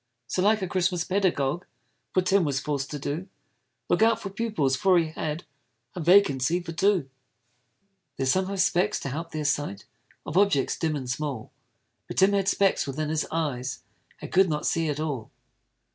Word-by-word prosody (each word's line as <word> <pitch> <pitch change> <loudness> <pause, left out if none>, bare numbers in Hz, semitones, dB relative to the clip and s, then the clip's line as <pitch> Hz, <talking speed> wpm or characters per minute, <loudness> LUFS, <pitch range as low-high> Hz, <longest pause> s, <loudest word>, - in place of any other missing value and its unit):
So, 180 - -1
like 210 +1 +3
a - - -1
Christmas 180 -1 0
pedagogue, 175 -5 0 0.5
Poor 185 - +4
Tim 190 +1 +3
was 140 -3 0
forc'd 140 -2 -3
to 150 - -4
do 150 +7 -4 0.6
Look - - +2
out 225 0 +4
for 195 -3 -6
pupils, 195 -11 0
for 190 0 +4
he 165 -2 +1
had 155 +1 -4 0.5
A - - -6
vacancy 170 -3 +4
for 175 -1 -7
two. 190 -3 +2 1.1
There's 130 -1 +1
some 185 0 +1
have 195 0 -4
specs 185 +2 +2
to 140 - -4
help 165 +5 -5
their 155 -2 -4
sight 140 -8 -1 0.4
Of 150 - -3
objects 200 -10 +2
dim 160 -2 0
and 135 -3 -5
small: 125 -3 -4 0.6
But - - -7
Tim 195 +1 +5
had 195 -1 +1
specks 195 -6 +2
within 150 +3 -3
his 155 0 -1
eyes, 135 -6 -3 0.4
And - - -8
could 190 0 +4
not 150 -1 -2
see 165 -1 +1
at 145 0 -2
all. 145 -8 -3
165 Hz, 180 wpm, -26 LUFS, 145-190 Hz, 1.1 s, Tim